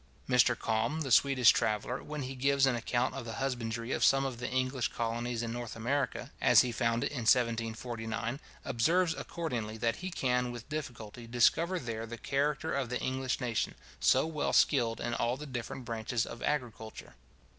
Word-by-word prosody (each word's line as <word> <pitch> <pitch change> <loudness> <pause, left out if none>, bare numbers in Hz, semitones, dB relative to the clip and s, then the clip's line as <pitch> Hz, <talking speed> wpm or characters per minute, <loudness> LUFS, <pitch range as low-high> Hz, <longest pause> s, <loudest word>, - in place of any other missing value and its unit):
Mr 125 -1 +4
Kalm, 115 +8 0
the 135 -4 -3
Swedish 130 -1 +6
traveller, 110 +4 -1
when 150 -2 -5
he 130 +1 -5
gives 135 +1 +3
an 135 -2 +2
account 120 +2 0
of 135 - -5
the 115 -1 -6
husbandry 120 -3 -3
of - - 0
some 135 0 +5
of 130 -3 -4
the 125 - -3
English 130 -3 0
colonies 115 +1 -2
in 115 -1 -3
North 120 -1 -5
America, 125 +3 -2
as - - +7
he 125 - -1
found 115 0 0
it - - -1
in 140 - -4
1749, 115 0 0 0.3
observes, 165 +8 +2
accordingly, 120 -12 -4
that 115 +1 0
he 185 - -5
can 125 -7 0
with 120 -2 -8
difficulty 120 -6 -6
discover 160 +10 +3
there 115 -6 -4
the 115 +1 -7
character 145 +6 -1
of 135 -4 -1
the 125 - -2
English 130 0 -1
nation, 120 -4 -1 0.2
so - - +4
well 155 -2 -2
skilled 120 -5 +3
in 120 - -2
all 120 +2 0
the 150 - -7
different 125 -1 -6
branches 115 0 -1
of 120 - -9
agriculture. 120 -6 -3
125 Hz, 180 wpm, -31 LUFS, 115-135 Hz, 0.3 s, as